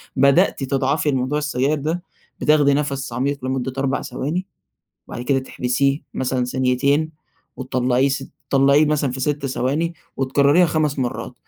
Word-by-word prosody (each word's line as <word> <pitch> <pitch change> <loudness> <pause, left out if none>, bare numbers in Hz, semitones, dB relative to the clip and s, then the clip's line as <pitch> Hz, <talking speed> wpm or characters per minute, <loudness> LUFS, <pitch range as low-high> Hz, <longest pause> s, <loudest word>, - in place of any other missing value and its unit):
بدأتِ 140 0 +3
تضعفي 135 +3 0
لموضوع 130 +3 0
السجاير 150 0 0
ده، 160 +5 -2 0.4
بتاخدي 150 -2 +4
نَفَس 140 -3 -2
عميق 135 +2 -2
لمدة 130 0 -2
4 135 0 0
ثواني، 150 +9 -3 0.6
بعد 120 - -6
كده 135 +2 +1
تحبسيه 135 +2 0
مثلًا 130 -1 -1
ثانيتين، 130 +5 +1 0.5
وتطلعيه 130 0 +1
س 135 0 -3 0.2
طلعيه 140 +2 +5
مثلًا 145 -3 +1
في 130 - -6
6 145 +1 -1
ثواني، 145 +6 -1 0.2
وتكرريها 140 +6 +3
5 155 -3 0
مرات. 125 -2 -3
140 Hz, 135 wpm, -21 LUFS, 130-150 Hz, 0.6 s, طلعيه